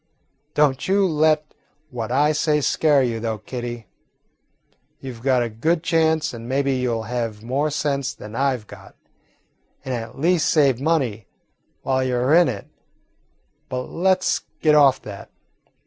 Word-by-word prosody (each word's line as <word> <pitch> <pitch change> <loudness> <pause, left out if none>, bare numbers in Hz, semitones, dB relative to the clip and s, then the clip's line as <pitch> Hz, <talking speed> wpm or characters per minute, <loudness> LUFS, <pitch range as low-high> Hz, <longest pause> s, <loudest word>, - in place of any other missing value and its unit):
"Don't 145 -3 +2
you 195 +1 +3
let 155 -2 +1 0.4
what 120 -2 -4
I 145 +3 +3
say 150 0 +1
scare 145 -1 +3
you, 115 -2 -1
though, 110 -1 -2
Kitty. 120 +1 -6 1.1
You 130 -2 -7
've 115 - -14
got 130 -1 +2
a - - -1
good 160 +10 0
chance, 160 -3 +1
and 115 0 -8
maybe 135 +1 +1
you 125 -1 -1
'll 115 -1 -2
have 115 -2 -4
more 135 +6 0
sense 140 -2 -1
than 105 -3 -10
I 135 0 +1
've 110 - -16
got, - - -14 0.9
and 130 - -3
at 115 -1 -6
least 165 +3 +2
save 135 -5 +3
money 130 - 0 0.6
while 130 0 +1
you 130 -1 -1
're 125 +4 +2
in 175 0 +6
it. 100 -6 -4 1.0
But 125 0 -4
let 185 +1 +2
's - - +1 0.2
get 155 - +4
off 140 -3 +5
that. 100 -2 -9
135 Hz, 165 wpm, -22 LUFS, 120-155 Hz, 1.1 s, in